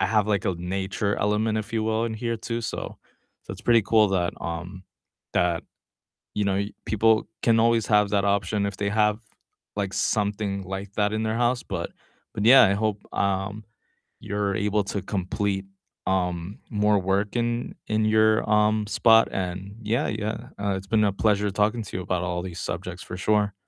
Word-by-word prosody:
I -, -, +3 dB
have, 105 Hz, -2 st, +2 dB
like, 100 Hz, -2 st, +1 dB
a 95 Hz, -, 0 dB
nature 95 Hz, +3 st, -2 dB
element, 110 Hz, +1 st, +1 dB
if 110 Hz, -, -6 dB
you 110 Hz, -1 st, 0 dB
will, 110 Hz, +1 st, +1 dB
in 110 Hz, -1 st, -3 dB
here 115 Hz, +1 st, -2 dB
too, 115 Hz, +1 st, -4 dB
so 115 Hz, -, -5 dB, 0.4 s
so -, -, -8 dB
it's -, -, -10 dB
pretty 115 Hz, -2 st, +6 dB
cool 110 Hz, 0 st, +4 dB
that, 90 Hz, -3 st, 0 dB
um 85 Hz, +3 st, -5 dB, 0.5 s
that, 90 Hz, -2 st, +1 dB, 0.7 s
you 105 Hz, -1 st, +1 dB
know, 95 Hz, -1 st, +1 dB
you 100 Hz, +1 st, -2 dB
people 110 Hz, 0 st, +3 dB, 0.2 s
can 115 Hz, -1 st, +4 dB
always 115 Hz, -1 st, +3 dB
have 105 Hz, -1 st, +4 dB
that 100 Hz, -1 st, +2 dB
option 100 Hz, 0 st, +1 dB
if 100 Hz, -1 st, -4 dB
they 100 Hz, -, -1 dB
have, 105 Hz, +1 st, +2 dB, 0.6 s
like, 100 Hz, -2 st, -2 dB
something 100 Hz, -2 st, -1 dB
like 95 Hz, +2 st, -6 dB
that 105 Hz, 0 st, +1 dB
in 110 Hz, +1 st, -1 dB
their 110 Hz, +1 st, -1 dB
house, 125 Hz, 0 st, 0 dB
but 85 Hz, -3 st, -4 dB, 0.4 s
but 105 Hz, -, -2 dB
yeah, 130 Hz, +3 st, +9 dB
I 100 Hz, -, +4 dB
hope, 105 Hz, 0 st, -1 dB
um, 100 Hz, +2 st, -1 dB, 0.6 s
you're 100 Hz, -1 st, -2 dB
able 105 Hz, 0 st, +2 dB
to 100 Hz, -, -1 dB
complete, 95 Hz, 0 st, -2 dB, 0.4 s
um, 90 Hz, 0 st, -1 dB
more 105 Hz, -1 st, +3 dB
work 100 Hz, +4 st, 0 dB
in 120 Hz, 0 st, -1 dB
in 110 Hz, 0 st, +1 dB
your, 110 Hz, 0 st, +4 dB, 0.2 s
um, 105 Hz, 0 st, +2 dB
spot 115 Hz, 0 st, +5 dB
and 95 Hz, +2 st, -4 dB
yeah, 115 Hz, +7 st, 0 dB
yeah, 110 Hz, +3 st, -3 dB
uh, 100 Hz, -1 st, 0 dB
it's 95 Hz, 0 st, -7 dB
been 110 Hz, -1 st, +4 dB
a 100 Hz, -, +2 dB
pleasure 105 Hz, 0 st, +1 dB
talking 105 Hz, +4 st, +1 dB
to 95 Hz, -, -6 dB
you 90 Hz, -, -3 dB
about 90 Hz, -1 st, -1 dB
all 90 Hz, 0 st, -2 dB
these 90 Hz, -3 st, -6 dB
subjects -, -, -6 dB
for -, -, -7 dB
sure. 105 Hz, +2 st, +1 dB
105 Hz, 190 wpm, -25 LUFS, 95-110 Hz, 0.7 s, yeah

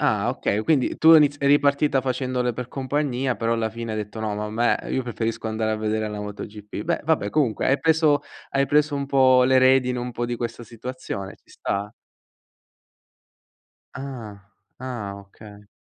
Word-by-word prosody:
Ah, 110 Hz, -7 st, +1 dB
okay, 110 Hz, -4 st, -1 dB
quindi 135 Hz, +1 st, +1 dB
tu 160 Hz, -, +4 dB
hai 165 Hz, -, +10 dB
iniz 145 Hz, -1 st, +3 dB
eri 140 Hz, 0 st, +5 dB
ripartita 145 Hz, -1 st, +2 dB
facendole 125 Hz, -1 st, -1 dB
per 125 Hz, +1 st, -6 dB
compagnia, 135 Hz, -1 st, -1 dB
però 115 Hz, 0 st, 0 dB
alla 115 Hz, -1 st, 0 dB
fine 115 Hz, 0 st, -6 dB
hai 110 Hz, -, -2 dB
detto: 105 Hz, +1 st, -6 dB
"No, 110 Hz, -1 st, -2 dB
ma 105 Hz, +1 st, -3 dB
a -, -, -6 dB
me 120 Hz, +2 st, +2 dB
io 130 Hz, -, 0 dB
preferisco 115 Hz, -1 st, -3 dB
andare 110 Hz, 0 st, -1 dB
a -, -, -1 dB
vedere 110 Hz, 0 st, -1 dB
la 105 Hz, -1 st, -5 dB
MotoGP." 105 Hz, 0 st, -7 dB
Beh -, -, 0 dB
vabbè, 150 Hz, -10 st, +1 dB
comunque 135 Hz, -6 st, +1 dB
hai 135 Hz, +2 st, +3 dB
preso 160 Hz, -3 st, +3 dB, 0.3 s
hai 135 Hz, 0 st, +1 dB
preso 150 Hz, +1 st, +2 dB
un 140 Hz, -1 st, -2 dB
po' 130 Hz, -2 st, +5 dB
le 130 Hz, +1 st, +4 dB
redini 130 Hz, -1 st, +4 dB
un 125 Hz, 0 st, -4 dB
po' 120 Hz, +1 st, -3 dB
di 120 Hz, 0 st, -3 dB
questa 120 Hz, 0 st, -5 dB
situazione, 115 Hz, -4 st, -7 dB
ci -, -, -28 dB
sta. 100 Hz, +2 st, -3 dB, 2.0 s
Ah, 120 Hz, -7 st, -7 dB, 0.4 s
ah. 115 Hz, -6 st, -5 dB
Okay. 100 Hz, +1 st, -15 dB
120 Hz, 180 wpm, -23 LUFS, 110-135 Hz, 2.0 s, hai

